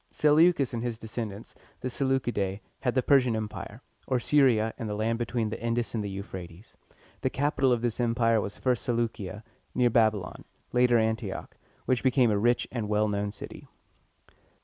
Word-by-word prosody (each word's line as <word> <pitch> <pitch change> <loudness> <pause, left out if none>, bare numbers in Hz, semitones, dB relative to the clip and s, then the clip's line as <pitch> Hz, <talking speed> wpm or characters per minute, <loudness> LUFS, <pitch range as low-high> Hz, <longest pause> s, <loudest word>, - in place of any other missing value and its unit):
Seleucus 150 -2 +4
and 115 - -2
his 120 -2 -3
descendants, 110 -2 -6 0.3
the - - -2
Se 125 +2 -2
leu´ci 130 -2 +1
dæ, 100 -1 -1 0.2
had 125 -1 -1
the 130 - +2
Persian 130 -5 +4
Empire, 110 +2 -6 0.2
or 130 -2 +1
Syria 120 -6 +3
and 115 -3 -3
the 105 - -2
land 115 +2 0
between 115 -2 -1
the 110 - -6
Indus 115 0 -1
and 110 -2 -1
the 100 - -3
Euphrates. 95 -1 -8 0.5
The - - +1
capital 135 -2 +1
of 120 -1 +1
this 120 -1 -1
empire 115 -2 +2
was 100 +1 -5
first 125 -3 0
Se - - 0
leu´cia, 110 -3 -3 0.3
near 125 -1 +3
Babylon, 110 -5 +2
and - - -37 0.3
later 125 0 +4
An´ti 110 -2 0
och, - - -8 0.3
which 130 -1 +1
became 125 -3 +3
a 100 - +1
rich 120 +3 +2
and 115 -4 -3
well 105 0 +2
known 105 0 -1
city. 100 - -9
115 Hz, 190 wpm, -28 LUFS, 105-125 Hz, 0.5 s, Seleucus